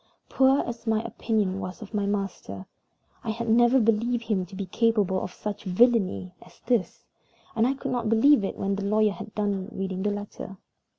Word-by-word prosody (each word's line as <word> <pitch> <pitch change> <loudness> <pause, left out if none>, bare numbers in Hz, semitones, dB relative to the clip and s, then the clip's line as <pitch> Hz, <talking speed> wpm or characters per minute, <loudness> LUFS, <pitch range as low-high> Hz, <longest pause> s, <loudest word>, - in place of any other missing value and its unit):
Poor 265 +1 +4
as 235 -1 -7
my 220 -1 +2
opinion 215 -4 -1
was 185 -1 -6
of 215 - -13
my 205 -1 0
master, 195 - -4 0.6
I - - -4
had 230 +2 -3
never 240 +3 +5
believed 230 +1 +1
him 200 -5 -1
to 190 - -11
be 195 0 -4
capable 205 -2 +1
of - - -5
such 210 +2 -6
villainy 190 -2 +2
as - - -18
this, 240 -7 -1 0.5
and 230 +1 +3
I 270 - 0
could - - -5
not 240 -3 -1
believe 230 +2 +5
it 195 - -3
when 195 0 -1
the 200 - -3
lawyer 215 +1 +3
had 215 +1 -9
done 205 -2 -1
reading 190 -3 -4
the 210 - +1
letter. 205 -1 -6
210 Hz, 190 wpm, -26 LUFS, 195-230 Hz, 0.6 s, never